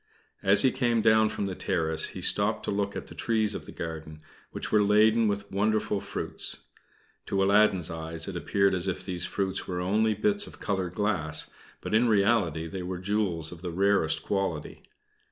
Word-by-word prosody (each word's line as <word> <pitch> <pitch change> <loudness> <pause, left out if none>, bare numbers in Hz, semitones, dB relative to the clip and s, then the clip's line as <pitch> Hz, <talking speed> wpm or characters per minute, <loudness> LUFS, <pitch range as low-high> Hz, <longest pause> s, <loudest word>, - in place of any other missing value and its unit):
As 100 +1 +6
he 130 - +4
came 120 -4 0
down 110 -1 +4
from 105 -1 -3
the 95 - -3
terrace, 80 -3 +1
he - - -7
stopped - - +1
to - - -2
look 100 0 -2
at - - -5
the - - -10
trees 110 -2 0
of - - -7
the - - -8
garden, 80 -2 -7 0.3
which - - -5
were 105 - +4
laden 110 +2 +4
with 100 0 -3
wonderful 105 +1 0
fruits. - - -1 0.6
To 95 -1 +1
Aladdin's 100 -3 +3
eyes 80 -1 -4
it - - -5
appeared 100 -1 +1
as 90 0 -1
if 95 - -3
these 90 -3 -3
fruits 95 -1 -3
were 90 -1 -3
only 105 +4 +1
bits 205 - +1
of - - -13
colored 95 -3 -3
glass, 90 -7 0 0.3
but - - -5
in 115 +2 +4
reality 100 -7 +2
they 90 +3 -6
were 90 0 -4
jewels 95 -4 -1
of 85 -2 -11
the 90 - -4
rarest 85 -3 +1
quality. 95 -6 -3
100 Hz, 190 wpm, -27 LUFS, 85-105 Hz, 0.6 s, As